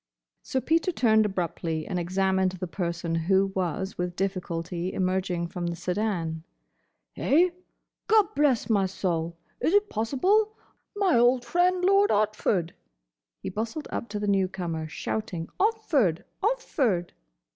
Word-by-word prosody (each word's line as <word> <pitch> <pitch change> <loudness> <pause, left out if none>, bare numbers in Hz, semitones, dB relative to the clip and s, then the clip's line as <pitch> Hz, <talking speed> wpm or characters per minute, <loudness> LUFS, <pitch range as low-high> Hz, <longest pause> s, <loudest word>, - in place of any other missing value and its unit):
Sir 260 - -2
Peter 330 +5 +2
turned 220 -8 +3
abruptly 170 -4 -3
and 180 - -2
examined 190 +1 +1
the 185 0 -4
person 170 -2 -3
who 190 +4 +2
was 190 +1 -2
with 175 0 -2
difficulty 180 -2 -3
emerging 185 -2 -1
from 175 0 -4
the 170 - -2
sedan. 175 -3 -2 0.7
"Eh?— 345 +5 +3 0.6
Gobblessmysoul! 215 - +2 0.2
Is 355 - +2
it 410 0 +3
possible?— 380 - +1 0.4
My 385 - +3
old 245 +1 +4
friend, 360 +3 +2
Lord 395 +2 +5
Otford!" 205 -4 +1 0.7
He - - -3
bustled 225 +9 -4
up 235 - -4
to 210 0 -3
the 205 - -2
newcomer, 185 -5 -1
shouting 175 +1 -4
"Otford! 340 - +2 0.2
Otford!" 280 - 0
195 Hz, 120 wpm, -27 LUFS, 175-280 Hz, 0.7 s, Lord